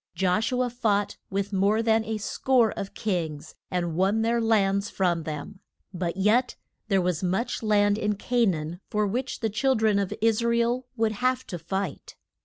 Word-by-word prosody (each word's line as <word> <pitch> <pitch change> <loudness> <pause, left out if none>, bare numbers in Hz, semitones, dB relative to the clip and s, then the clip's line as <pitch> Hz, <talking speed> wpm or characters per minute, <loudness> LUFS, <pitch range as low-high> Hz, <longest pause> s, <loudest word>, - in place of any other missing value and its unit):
Josh 190 +5 +1
u 250 0 +1
a 250 - -1
fought 210 -4 0
with 200 +1 -2
more 200 +4 +2
than 225 -1 +3
a 220 0 -2
score 235 +2 +2
of 195 - -6
kings 160 -7 -3 0.2
and 175 -3 -2
won 195 +5 +2
their 235 +1 +1
lands 200 -3 +2
from 175 -4 0
them; 155 +6 -6 0.3
but 175 0 -3
yet 220 +6 +2 0.3
there 195 -2 +3
was 180 -3 0
much 190 +6 -1
land 205 -1 +3
in 210 -1 0
Ca 240 +3 +1
naan 165 -1 -2
for 210 0 +1
which 245 +7 -3
the 225 - +1
chil 265 +5 +2
dren 215 -2 +2
of 200 -2 -2
Is 225 0 +2
ra 235 0 +2
el 240 +2 0
would 225 -1 +2
have 255 +4 0
to 175 - -6
fight. 190 +1 -4
205 Hz, 190 wpm, -26 LUFS, 185-225 Hz, 0.3 s, than